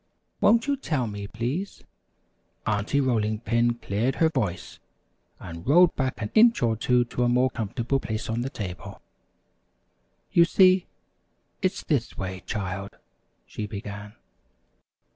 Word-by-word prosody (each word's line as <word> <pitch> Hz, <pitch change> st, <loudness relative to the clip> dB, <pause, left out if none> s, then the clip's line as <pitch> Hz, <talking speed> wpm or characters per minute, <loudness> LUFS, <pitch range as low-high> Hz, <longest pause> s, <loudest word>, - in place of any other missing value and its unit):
"Won't 230 Hz, +3 st, +4 dB
you 285 Hz, 0 st, +1 dB
tell 150 Hz, -, -1 dB
me, 105 Hz, -2 st, -6 dB
please?" 125 Hz, -, -4 dB, 0.8 s
Aunty 105 Hz, +6 st, 0 dB
Rolling 110 Hz, -5 st, 0 dB
Pin 120 Hz, +1 st, +1 dB
cleared 115 Hz, +3 st, -1 dB
her 160 Hz, -, +3 dB
voice, 95 Hz, -, -3 dB, 0.6 s
and 85 Hz, +1 st, -9 dB
rolled 175 Hz, +5 st, +5 dB
back 130 Hz, -2 st, -2 dB
an 105 Hz, -3 st, -4 dB
inch 230 Hz, -, +5 dB
or 115 Hz, -1 st, +2 dB
two 125 Hz, +2 st, +2 dB
to 120 Hz, -, -4 dB
a 120 Hz, -, +3 dB
more 125 Hz, +1 st, +2 dB
comfortable 120 Hz, +5 st, -2 dB
place 110 Hz, -3 st, -4 dB
on 115 Hz, +1 st, -2 dB
the 130 Hz, -, -2 dB
table. 95 Hz, -9 st, -7 dB, 1.3 s
"You 170 Hz, -, +6 dB
see, 185 Hz, +1 st, +4 dB, 0.7 s
it's 190 Hz, 0 st, -1 dB
this 140 Hz, -7 st, -1 dB
way, 95 Hz, -1 st, -5 dB
child," 95 Hz, -2 st, -4 dB, 0.5 s
she 105 Hz, -, -6 dB
began. 105 Hz, +1 st, -8 dB
120 Hz, 135 wpm, -26 LUFS, 105-140 Hz, 1.3 s, You